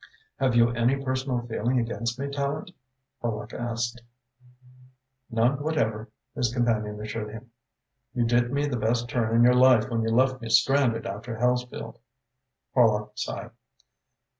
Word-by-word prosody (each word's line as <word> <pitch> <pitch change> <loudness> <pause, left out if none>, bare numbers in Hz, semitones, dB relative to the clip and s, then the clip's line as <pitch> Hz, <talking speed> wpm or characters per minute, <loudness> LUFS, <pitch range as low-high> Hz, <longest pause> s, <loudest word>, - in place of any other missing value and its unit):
"Have 130 -3 +2
you 115 0 +5
any 120 +3 +2
personal 130 -2 -2
feeling 120 +2 -1
against 115 0 -2
me, 140 - -3
Tallente?" 140 +5 -3 0.5
Horlock 110 -1 -4
asked. 120 0 -3 1.3
"None 120 +5 +1
whatever," 115 -8 -1 0.2
his 120 -2 0
companion 110 -4 0
assured 105 0 -5
him. 110 +3 -11 0.6
"You 120 -1 +2
did 120 +1 +2
me 140 +1 +1
the 140 -4 -2
best 115 +2 0
turn 115 -2 0
in 115 - +6
your 125 +1 +6
life 125 -2 +5
when 115 -1 0
you 115 - 0
left 130 +2 +2
me 115 - -6
stranded 120 -3 +3
after 110 +4 -5
Hellesfield." 125 0 -1 0.7
Horlock 105 -4 +3
sighed. - - -5
120 Hz, 140 wpm, -26 LUFS, 115-130 Hz, 1.3 s, in